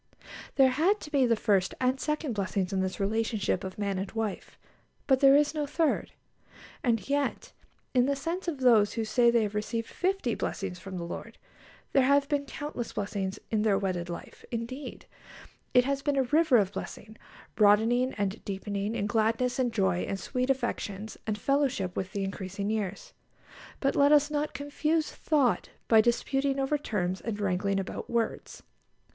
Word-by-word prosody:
There 265 Hz, -1 st, +6 dB
had 345 Hz, +11 st, +2 dB
to 300 Hz, -, -9 dB
be 270 Hz, -4 st, +3 dB
the 230 Hz, -, +3 dB
first 200 Hz, -4 st, +1 dB
and 255 Hz, +1 st, +1 dB
second 300 Hz, -3 st, -2 dB
blessings 195 Hz, -1 st, -1 dB
in 190 Hz, -, +1 dB
this 190 Hz, 0 st, -3 dB
relationship 215 Hz, -1 st, 0 dB
of 190 Hz, 0 st, -6 dB
man 200 Hz, -2 st, -1 dB
and 195 Hz, +1 st, -4 dB
wife, 220 Hz, -3 st, -4 dB, 0.5 s
but 265 Hz, -2 st, +3 dB
there 275 Hz, 0 st, +7 dB
is 295 Hz, +1 st, +3 dB
no 300 Hz, -2 st, -2 dB
third. 320 Hz, +1 st, 0 dB, 0.7 s
And 230 Hz, -4 st, +1 dB
yet 285 Hz, 0 st, -1 dB, 0.4 s
in 250 Hz, 0 st, +4 dB
the 280 Hz, -, +1 dB
sense 335 Hz, +7 st, -4 dB
of 295 Hz, -6 st, -3 dB
those 225 Hz, -5 st, +5 dB
who 225 Hz, -2 st, -2 dB
say 235 Hz, +2 st, +4 dB
they 235 Hz, -1 st, +3 dB
have 210 Hz, -1 st, -3 dB
received 220 Hz, +2 st, -2 dB
fifty 370 Hz, -, -1 dB
blessings 185 Hz, -4 st, -4 dB
from 190 Hz, 0 st, -7 dB
the 170 Hz, -, -4 dB
Lord, 170 Hz, -, -7 dB, 0.6 s
there 270 Hz, -, +5 dB
have 280 Hz, +2 st, +4 dB
been 285 Hz, -1 st, 0 dB
countless 290 Hz, -6 st, -5 dB
blessings 200 Hz, -2 st, -3 dB
in 215 Hz, -2 st, +2 dB
their 210 Hz, -2 st, +3 dB
wedded 185 Hz, -3 st, -2 dB
life; 170 Hz, -, -8 dB
indeed, 250 Hz, +4 st, -6 dB, 0.7 s
it 250 Hz, 0 st, +6 dB
has 275 Hz, 0 st, -1 dB
been 285 Hz, -1 st, 0 dB
a 270 Hz, -, +4 dB
river 300 Hz, 0 st, +4 dB
of 200 Hz, -3 st, +2 dB
blessing, 220 Hz, +1 st, -7 dB, 0.4 s
broadening 225 Hz, +5 st, +4 dB
and 205 Hz, 0 st, -2 dB
deepening 200 Hz, +1 st, -3 dB
in 200 Hz, -, -1 dB
gladness 225 Hz, +4 st, +1 dB
and 250 Hz, -2 st, +1 dB
joy 190 Hz, -5 st, +1 dB
and 195 Hz, +1 st, -3 dB
sweet 255 Hz, +6 st, -2 dB
affections 220 Hz, -5 st, -2 dB
and 215 Hz, -1 st, -1 dB
fellowship 265 Hz, -7 st, 0 dB
with 190 Hz, 0 st, -3 dB
the 200 Hz, -2 st, -2 dB
increasing 195 Hz, +1 st, -4 dB
years. 200 Hz, -3 st, -3 dB, 0.7 s
But 275 Hz, -, +1 dB
let 285 Hz, +1 st, +5 dB
us 295 Hz, 0 st, +5 dB
not 300 Hz, 0 st, -2 dB
confuse 300 Hz, +2 st, -1 dB
thought 285 Hz, -6 st, +1 dB, 0.2 s
by 220 Hz, -1 st, +7 dB
disputing 270 Hz, +4 st, 0 dB
over 275 Hz, +2 st, 0 dB
terms 185 Hz, -8 st, -2 dB
and 220 Hz, -3 st, -4 dB
wrangling 195 Hz, 0 st, 0 dB
about 190 Hz, -, -5 dB
words. 235 Hz, -1 st, -2 dB
230 Hz, 175 wpm, -29 LUFS, 200-275 Hz, 0.7 s, there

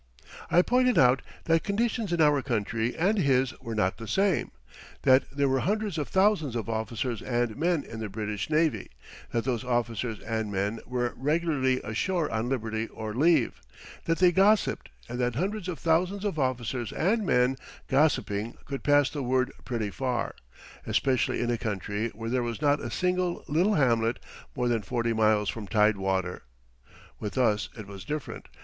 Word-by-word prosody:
I 175 Hz, -, +5 dB
pointed 250 Hz, +1 st, +3 dB
out 125 Hz, 0 st, +5 dB, 0.2 s
that 165 Hz, -1 st, +2 dB
conditions 220 Hz, 0 st, -1 dB
in 170 Hz, -1 st, +1 dB
our 150 Hz, -2 st, +4 dB
country 115 Hz, -1 st, -1 dB
and 195 Hz, +6 st, +2 dB
his 135 Hz, -5 st, +2 dB
were 115 Hz, -1 st, -5 dB
not 95 Hz, -3 st, +1 dB
the 115 Hz, -, -7 dB
same. 195 Hz, -, +1 dB, 0.5 s
That 130 Hz, 0 st, +5 dB
there 140 Hz, 0 st, 0 dB
were 135 Hz, 0 st, +2 dB
hundreds 205 Hz, 0 st, -1 dB
of 150 Hz, -, -2 dB
thousands 190 Hz, -, +2 dB
of 115 Hz, -1 st, -3 dB
officers 115 Hz, +1 st, -2 dB
and 120 Hz, -3 st, -1 dB
men 165 Hz, -1 st, +1 dB
in 110 Hz, -, -8 dB
the 110 Hz, -1 st, -4 dB
British 105 Hz, 0 st, -4 dB
navy; 155 Hz, 0 st, +1 dB, 0.4 s
that 115 Hz, -1 st, 0 dB
those 125 Hz, -2 st, -1 dB
officers 120 Hz, -2 st, -1 dB
and 110 Hz, -2 st, -3 dB
men 100 Hz, +3 st, -1 dB
were 125 Hz, -1 st, -1 dB
regularly 145 Hz, -3 st, +1 dB
ashore 165 Hz, -, -1 dB
on 115 Hz, +2 st, -1 dB
liberty 110 Hz, -3 st, -2 dB
or 110 Hz, -1 st, -6 dB
leave; 150 Hz, +1 st, +2 dB, 0.4 s
that 165 Hz, 0 st, +1 dB
they 180 Hz, -1 st, +5 dB
gossiped, 200 Hz, +4 st, +3 dB, 0.2 s
and 125 Hz, -, -5 dB
that 125 Hz, -1 st, 0 dB
hundreds 195 Hz, -, -2 dB
of 180 Hz, -3 st, -3 dB
thousands 180 Hz, +5 st, +1 dB
of 195 Hz, -7 st, -1 dB
officers 125 Hz, -3 st, -1 dB
and 215 Hz, +6 st, +1 dB
men 125 Hz, -6 st, +3 dB, 0.3 s
gossiping 120 Hz, -7 st, +1 dB
could 135 Hz, -1 st, -5 dB
pass 145 Hz, -1 st, +4 dB
the 145 Hz, -, -4 dB
word 130 Hz, +1 st, +1 dB
pretty 115 Hz, -5 st, -2 dB
far, 125 Hz, 0 st, -2 dB, 0.5 s
especially 130 Hz, -3 st, +1 dB
in 120 Hz, 0 st, 0 dB
a 120 Hz, -, -1 dB
country 105 Hz, +1 st, -2 dB
where 115 Hz, +1 st, -5 dB
there 130 Hz, 0 st, +1 dB
was 120 Hz, -1 st, -3 dB
not 145 Hz, 0 st, +2 dB
a -, -, -4 dB
single 180 Hz, -1 st, -1 dB
little 180 Hz, +8 st, +2 dB
hamlet 115 Hz, -4 st, +2 dB, 0.4 s
more 125 Hz, -1 st, 0 dB
than 115 Hz, -2 st, +1 dB
40 115 Hz, +1 st, -1 dB
miles 110 Hz, -2 st, +3 dB
from 110 Hz, -3 st, -5 dB
tide 105 Hz, 0 st, +3 dB
water. 95 Hz, -2 st, -1 dB, 0.8 s
With 105 Hz, +4 st, -5 dB
us 110 Hz, -5 st, +2 dB
it 105 Hz, -, -7 dB
was 100 Hz, -1 st, -9 dB
different. 150 Hz, +8 st, -5 dB
125 Hz, 175 wpm, -28 LUFS, 115-160 Hz, 0.8 s, I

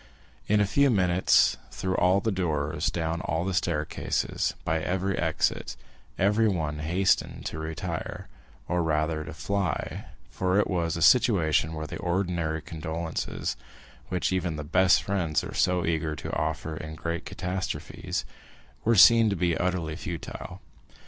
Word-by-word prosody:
In 105 Hz, 0 st, +3 dB
a 105 Hz, -, +4 dB
few 140 Hz, +8 st, +3 dB
minutes, 95 Hz, -5 st, +4 dB
through 95 Hz, 0 st, -2 dB
all 95 Hz, +2 st, +3 dB
the 110 Hz, -, 0 dB
doors, 80 Hz, -4 st, -1 dB
down 85 Hz, 0 st, -2 dB
all 85 Hz, -3 st, -1 dB
the 95 Hz, -, -1 dB
staircases, 75 Hz, -4 st, -1 dB
by 80 Hz, 0 st, 0 dB
every 95 Hz, +3 st, -1 dB
exit, -, -, -1 dB, 0.4 s
everyone 95 Hz, -7 st, +1 dB
hastened 90 Hz, +5 st, +1 dB
to 80 Hz, -, -4 dB
retire, 80 Hz, 0 st, -5 dB, 0.4 s
or 90 Hz, 0 st, +1 dB
rather 80 Hz, -1 st, 0 dB
to -, -, -8 dB
fly; 100 Hz, -7 st, -2 dB, 0.3 s
for 95 Hz, +1 st, 0 dB
it 105 Hz, -, +3 dB
was 85 Hz, -3 st, -1 dB
a 85 Hz, -, 0 dB
situation 85 Hz, -9 st, +4 dB
where 80 Hz, 0 st, -4 dB
the -, -, -7 dB
ordinary 85 Hz, -4 st, -1 dB
condolences,—which 80 Hz, +3 st, -4 dB
even 90 Hz, -3 st, -1 dB
the 75 Hz, -, -5 dB
best 90 Hz, +4 st, +4 dB
friends 85 Hz, -6 st, 0 dB
are -, -, -6 dB
so 90 Hz, -1 st, +2 dB
eager 80 Hz, -1 st, -1 dB
to -, -, -5 dB
offer 80 Hz, -1 st, -2 dB
in 80 Hz, 0 st, -7 dB
great 85 Hz, +2 st, -3 dB
catastrophes,—were 95 Hz, +4 st, -4 dB
seen 115 Hz, +2 st, +8 dB
to 100 Hz, -, 0 dB
be 85 Hz, -2 st, +1 dB
utterly 90 Hz, -3 st, -1 dB
futile. 85 Hz, -1 st, -7 dB
85 Hz, 140 wpm, -27 LUFS, 80-95 Hz, 0.4 s, seen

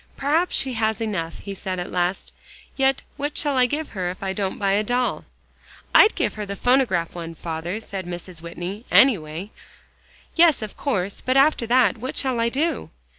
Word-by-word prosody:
"Perhaps 315 Hz, +6 st, +1 dB
she 265 Hz, -1 st, 0 dB
has 220 Hz, -1 st, 0 dB
enough," 190 Hz, -7 st, -3 dB
he 200 Hz, -, -7 dB
said 190 Hz, -1 st, -4 dB
at 180 Hz, -, -5 dB
last. 180 Hz, +1 st, -1 dB, 0.4 s
"Yet 270 Hz, 0 st, +2 dB
what 290 Hz, +1 st, -3 dB
shall 290 Hz, -3 st, +2 dB
I 250 Hz, -1 st, +4 dB
give 300 Hz, +4 st, -3 dB
her 185 Hz, -3 st, -3 dB
if 185 Hz, +2 st, -7 dB
I 190 Hz, -1 st, -1 dB
don't 195 Hz, -2 st, -2 dB
buy 200 Hz, -1 st, +1 dB
a 200 Hz, +2 st, +3 dB
doll?" 245 Hz, +3 st, -1 dB, 0.7 s
"I'd 430 Hz, -, +7 dB
give -, -, 0 dB
her 210 Hz, -1 st, -5 dB
the 200 Hz, -, -4 dB
phonograph 235 Hz, -8 st, +2 dB
one, 165 Hz, -1 st, -7 dB
father," 165 Hz, +5 st, -4 dB
said 195 Hz, -5 st, -7 dB
Mrs. 175 Hz, -1 st, -7 dB
Whitney, 175 Hz, +5 st, -6 dB
"anyway." 185 Hz, -, +3 dB, 0.8 s
"Yes, 330 Hz, -7 st, +5 dB
of 215 Hz, -, -7 dB
course; 200 Hz, -9 st, -2 dB
but 255 Hz, +1 st, +1 dB
after 275 Hz, -4 st, +4 dB
that, 235 Hz, -4 st, +3 dB
what 255 Hz, +3 st, -5 dB
shall 260 Hz, -3 st, 0 dB
I 230 Hz, 0 st, +2 dB
do?" 305 Hz, +7 st, -1 dB
215 Hz, 185 wpm, -23 LUFS, 180-260 Hz, 0.8 s, I'd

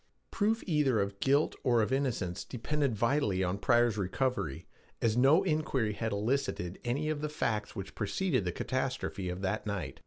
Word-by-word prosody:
Proof 220 Hz, +2 st, +1 dB
either 150 Hz, -, +2 dB
of 100 Hz, 0 st, -2 dB
guilt 140 Hz, +3 st, +3 dB
or 120 Hz, -3 st, +4 dB
of 115 Hz, -, -1 dB
innocence 120 Hz, -10 st, -1 dB
depended 135 Hz, +1 st, -1 dB
vitally 105 Hz, -4 st, +1 dB
on 90 Hz, +2 st, -1 dB
Pryor's 120 Hz, -1 st, +3 dB
recovery, 95 Hz, -, -1 dB, 0.3 s
as 110 Hz, -1 st, +1 dB
no 140 Hz, +9 st, +5 dB
inquiry 150 Hz, -, 0 dB
had 110 Hz, +1 st, -2 dB
elicited 100 Hz, -4 st, -1 dB
any 135 Hz, +6 st, -1 dB
of 150 Hz, -1 st, -3 dB
the 150 Hz, -, -2 dB
facts 110 Hz, -8 st, -2 dB
which 95 Hz, -3 st, -6 dB
preceded 130 Hz, -, 0 dB
the 90 Hz, -, -1 dB
catastrophe 130 Hz, -4 st, -2 dB
of 90 Hz, +1 st, -4 dB
that 105 Hz, +3 st, -2 dB
night. 90 Hz, -10 st, -4 dB
120 Hz, 165 wpm, -31 LUFS, 100-140 Hz, 0.3 s, no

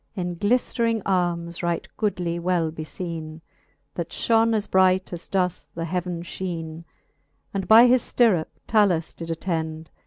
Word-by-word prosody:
In 175 Hz, -3 st, -3 dB
gliflering 230 Hz, +1 st, +1 dB
armes 175 Hz, -2 st, -1 dB
right 170 Hz, -1 st, -1 dB
goodly 175 Hz, -5 st, -1 dB
well 170 Hz, -2 st, 0 dB
befeene, 160 Hz, 0 st, -6 dB, 0.5 s
That 170 Hz, -1 st, -4 dB
fhone 225 Hz, +4 st, +2 dB
as 210 Hz, -1 st, 0 dB
bright, 185 Hz, -1 st, +3 dB
as 170 Hz, -, -7 dB
doth 180 Hz, -3 st, -1 dB
the 165 Hz, 0 st, -3 dB
heaven, 175 Hz, 0 st, -3 dB
fheene; 170 Hz, -2 st, -6 dB, 0.7 s
And 195 Hz, -2 st, -3 dB
by 225 Hz, +2 st, +9 dB
his 250 Hz, 0 st, +5 dB
ftirrup 205 Hz, -10 st, +3 dB, 0.2 s
7alus 195 Hz, -7 st, +2 dB
did 165 Hz, 0 st, -7 dB
attend. 160 Hz, -2 st, -3 dB
175 Hz, 135 wpm, -24 LUFS, 165-200 Hz, 0.7 s, by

